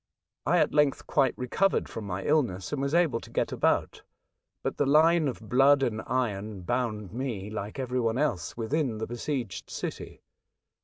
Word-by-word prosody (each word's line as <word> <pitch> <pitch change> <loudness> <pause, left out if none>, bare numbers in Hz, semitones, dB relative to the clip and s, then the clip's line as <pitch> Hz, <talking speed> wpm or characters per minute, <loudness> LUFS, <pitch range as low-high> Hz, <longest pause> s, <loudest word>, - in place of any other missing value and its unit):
I - - +4
at - - +2
length 150 -2 +2
quite 135 -4 +2
recovered 185 +10 +1
from 110 - -7
my 95 0 -3
illness 125 -10 0
and 140 - -1
was 140 +3 0
able 165 -9 +3
to - - -13
get - - -1
about; - - +1 0.6
but - - -2
the 145 - +1
line 160 +2 +5
of 130 - -3
^' 110 - -12
blood 135 +3 +5
and 110 -4 -1
iron" 105 -5 -2
bound 105 -1 -2
me, 115 -5 -4
like 105 +1 -5
every 130 -1 -1
one 115 -1 0
else, 130 - -1
within 120 0 -1
the 110 - -3
besieged 120 -4 -4
city. - - -6
125 Hz, 175 wpm, -28 LUFS, 110-140 Hz, 0.6 s, line